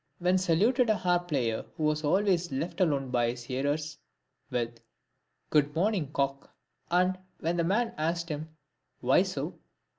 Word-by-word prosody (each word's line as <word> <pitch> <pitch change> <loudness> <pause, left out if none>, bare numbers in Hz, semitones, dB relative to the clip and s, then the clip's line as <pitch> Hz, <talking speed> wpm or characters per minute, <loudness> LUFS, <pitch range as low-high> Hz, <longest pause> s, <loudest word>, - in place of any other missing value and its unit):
He 180 +1 +3
saluted 220 +8 +3
a 215 - +4
harp 175 -2 +1
player 120 -8 0
who 160 - -2
was 155 0 +1
always 180 +1 +2
left 165 +7 -3
alone 140 -7 +1
by 120 -2 +2
his 120 0 -5
hearers, 145 +4 -2 0.5
with, 120 -1 -2 0.3
" - - -49
Good 145 0 +3
morning, 180 -5 +1
cock; 140 -1 -1 0.2
" - - -50
and 185 +1 +2 0.2
when 165 +2 0
the 170 - +1
man 220 +7 +1
asked 170 +2 0
him, 155 +1 -4 0.5
"Why - - +5
so - - -3
160 Hz, 160 wpm, -29 LUFS, 140-180 Hz, 0.5 s, Why